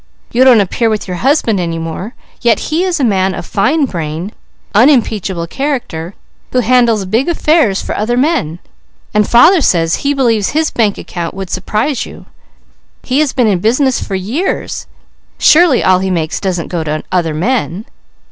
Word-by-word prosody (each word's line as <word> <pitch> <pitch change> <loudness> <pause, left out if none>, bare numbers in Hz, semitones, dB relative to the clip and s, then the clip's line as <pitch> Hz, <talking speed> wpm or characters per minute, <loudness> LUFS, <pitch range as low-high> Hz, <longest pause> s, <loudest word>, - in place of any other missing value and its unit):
You 245 +2 +3
don't 250 -5 +6
appear 225 +4 0
with 215 -2 -2
your 180 -1 -4
husband 245 - +1
any 165 -2 -2
more; 165 +8 -6 0.3
yet 235 -2 +3
he 330 +4 +1
is 360 -3 -1
a - - 0
man 190 -5 +1
of - - -6
fine 280 +9 +1
brain, 170 - -5 0.4
unimpeachable 215 - +2
character, 200 - -4 0.4
who 250 - +2
handles 235 -3 +2
big 230 - 0
affairs 305 - +2
for - - -4
other 235 +3 -1
men, 260 - 0 0.6
and 210 -1 +2
father 320 +10 +6
says 165 -8 +2
he 285 0 -1
believes 230 -6 +1
his 315 +2 0
bank 215 -4 0
account 170 -1 -6
would 190 -2 -6
surprise 215 +8 -1
you. - - -11 0.8
He 260 +2 0
has 305 -3 +1
been 250 -3 +1
in 200 -5 +1
business 255 +6 +1
for 195 - -4
years; 230 - -3 0.5
surely 315 -5 +4
all 185 -1 +4
he 190 0 -2
makes 165 -4 -2
doesn't 180 -4 -3
go 170 -3 -2
to 155 0 -3
other 170 -4 0
men." 210 +1 -1
215 Hz, 170 wpm, -13 LUFS, 185-265 Hz, 0.8 s, don't